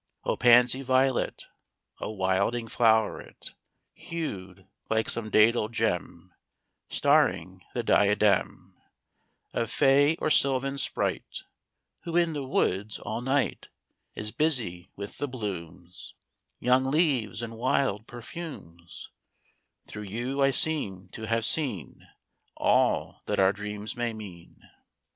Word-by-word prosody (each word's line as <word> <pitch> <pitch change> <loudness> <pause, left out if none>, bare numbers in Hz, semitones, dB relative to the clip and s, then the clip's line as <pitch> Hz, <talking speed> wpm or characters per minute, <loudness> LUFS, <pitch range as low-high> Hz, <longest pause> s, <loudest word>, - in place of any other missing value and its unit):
III - - +1
O - - 0
pansy 125 +1 +5
violet, 130 0 +1 0.6
O - - -4
wilding 105 +4 0
floweret, 110 -2 +1 0.4
Hued 100 - -6 0.2
like 110 0 +1
some 110 -2 -4
dædal 110 +1 +4
gem 95 -5 -2 0.6
Starring - - +2
the - - -1
diadem 105 0 +2 0.7
Of 115 - -1
fay 145 +5 +4
or 155 - -1
sylvan 135 0 +2
sprite, - - -2 0.6
Who, 170 0 -1
in 170 -2 +2
the 145 -2 -3
woods, 105 -4 0
all 110 +2 -5
night 135 +2 -1 0.5
Is 105 0 -4
busy 120 - -1
with 100 0 -8
the 145 - -1
blooms, 90 - -7 0.4
Young 125 +1 +3
leaves 135 - +1
and 115 -1 -5
wild 115 -2 0
perfumes, 120 - -9 0.7
Through 105 - -8
you 125 +6 -2
I 135 - +5
seem 110 - -1
t' 110 +3 -7
have 115 +1 +1
seen 120 - -2 0.5
All - - +1
that - - -1
our 95 0 +5
dreams 105 +1 -6
may 120 -1 -2
mean. 95 -6 -12
115 Hz, 115 wpm, -27 LUFS, 100-135 Hz, 0.7 s, pansy